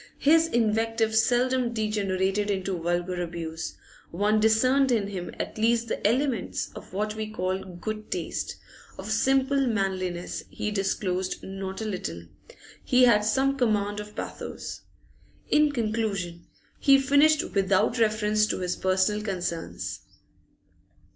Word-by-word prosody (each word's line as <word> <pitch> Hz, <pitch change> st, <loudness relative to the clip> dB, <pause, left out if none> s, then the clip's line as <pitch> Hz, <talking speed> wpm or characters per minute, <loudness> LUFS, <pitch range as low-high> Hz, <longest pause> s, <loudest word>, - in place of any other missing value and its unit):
His 325 Hz, +3 st, +4 dB
invective 225 Hz, -3 st, +1 dB
seldom 245 Hz, +2 st, +2 dB
degenerated 205 Hz, -2 st, 0 dB
into 190 Hz, -1 st, -1 dB
vulgar 175 Hz, +1 st, -1 dB
abuse; 165 Hz, -2 st, -5 dB, 0.3 s
one 210 Hz, +5 st, +1 dB
discerned 255 Hz, +5 st, +4 dB
in 210 Hz, -4 st, +1 dB
him 180 Hz, -4 st, -5 dB
at -, -, -4 dB
least 230 Hz, +1 st, +2 dB
the -, -, 0 dB
elements 250 Hz, -1 st, -1 dB
of -, -, -11 dB
what 210 Hz, +3 st, -2 dB
we 215 Hz, 0 st, -4 dB
call 185 Hz, -2 st, -2 dB
good 215 Hz, +4 st, -6 dB
taste; -, -, -3 dB, 0.4 s
of -, -, -6 dB
simple 270 Hz, 0 st, +2 dB
manliness 185 Hz, -5 st, -2 dB
he 210 Hz, -, -3 dB
disclosed 190 Hz, -2 st, -1 dB
not 195 Hz, +1 st, -5 dB
a -, -, -3 dB
little; 85 Hz, -, -4 dB, 0.6 s
he 250 Hz, 0 st, +4 dB
had 220 Hz, -4 st, +5 dB
some 270 Hz, +5 st, +1 dB
command 210 Hz, -3 st, +1 dB
of 210 Hz, 0 st, -8 dB
pathos. -, -, -6 dB, 0.7 s
In 300 Hz, 0 st, +4 dB
conclusion, 215 Hz, -8 st, -2 dB, 0.3 s
he 275 Hz, -2 st, +6 dB
finished 290 Hz, +4 st, +3 dB
without 195 Hz, +4 st, +2 dB
reference 215 Hz, -1 st, +2 dB
to -, -, -1 dB
his 180 Hz, -1 st, -2 dB
personal 190 Hz, +3 st, +1 dB
concerns. 180 Hz, -5 st, -4 dB
210 Hz, 130 wpm, -26 LUFS, 190-235 Hz, 0.7 s, he